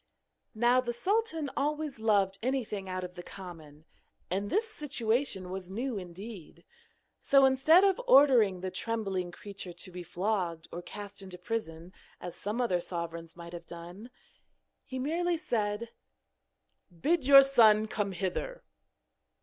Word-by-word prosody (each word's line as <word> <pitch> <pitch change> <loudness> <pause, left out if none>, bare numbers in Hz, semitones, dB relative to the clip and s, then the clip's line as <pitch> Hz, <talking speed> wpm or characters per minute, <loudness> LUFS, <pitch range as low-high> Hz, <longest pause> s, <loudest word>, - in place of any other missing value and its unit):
Now 240 +3 +4
the 240 -1 -3
sultan 325 - 0
always 295 -2 -2
loved 200 -3 +2
anything 220 -6 -2
out 185 0 -3
of 180 0 -7
the 175 - -8
common, 160 -5 -11 0.5
and 200 +2 -1
this 445 +3 +1
situation 245 - -2
was 185 -1 -6
new 240 +5 -3
indeed. 185 0 -10 0.6
So, 275 -1 +5
instead 275 +7 +5
of 395 +3 +3
ordering 245 - +6
the 185 0 -3
trembling 195 -3 -3
creature 195 -1 -8
to 175 +2 -7
be 180 0 -7
flogged 175 -2 -2
or 175 - -5
cast 205 +2 -8
into 190 -2 -9
prison, 180 -6 -5 0.3
as 175 -1 -7
some 210 +4 -4
other 185 -8 +1
sovereigns 170 -1 -6
might 170 0 -10
have 170 -1 -8
done, 175 +7 -10 0.8
he 260 - -6
merely 335 +6 0
said: 225 -6 -2 1.0
'Bid 260 - 0
your 275 -1 +10
son 220 -6 +5
come 205 -2 -2
hither.' 200 - -3
210 Hz, 140 wpm, -30 LUFS, 180-265 Hz, 1.0 s, your